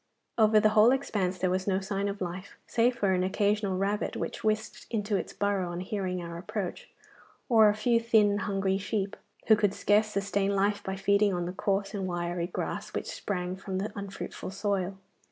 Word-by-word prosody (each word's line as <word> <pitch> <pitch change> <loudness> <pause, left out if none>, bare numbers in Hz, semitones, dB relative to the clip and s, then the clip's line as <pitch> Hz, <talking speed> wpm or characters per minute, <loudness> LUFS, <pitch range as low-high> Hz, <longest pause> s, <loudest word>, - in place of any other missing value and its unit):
Over 215 -1 +6
the 215 - +4
whole 215 +2 +6
expanse 200 -9 -1
there 185 0 0
was 185 +1 -1
no 190 -1 +2
sign 195 +1 -2
of 200 0 -4
life, 185 +2 -5
save 240 +2 +2
for 200 -5 +1
an 180 -1 +2
occasional 200 0 +1
rabbit 200 +2 -1
which - - -4
whisked 215 0 -1
into 210 -2 -1
its 190 - -2
burrow 200 -3 -1
on 175 0 -4
hearing 185 -2 -3
our 170 0 -6
approach, 200 -1 -5 0.6
or 220 -4 +6
a 205 - +1
few 230 +2 +2
thin 220 -3 +4
and 205 0 -1
hungry 195 0 0
sheep, 200 0 -2 0.3
who 220 - +7
could 205 -2 +1
scarce 210 +1 +3
sustain 200 -1 0
life 200 +1 +1
by 190 - -3
feeding 200 0 +2
on 175 -1 -2
the 180 - -4
coarse 195 0 -1
and 195 -2 -2
wiry 175 -1 -2
grass 175 - -4
which - - -3
sprang 180 -2 -3
from 190 0 -5
the 205 +2 -3
unfruitful 200 -2 -6
soil. 195 -1 -2
200 Hz, 195 wpm, -29 LUFS, 185-210 Hz, 0.6 s, who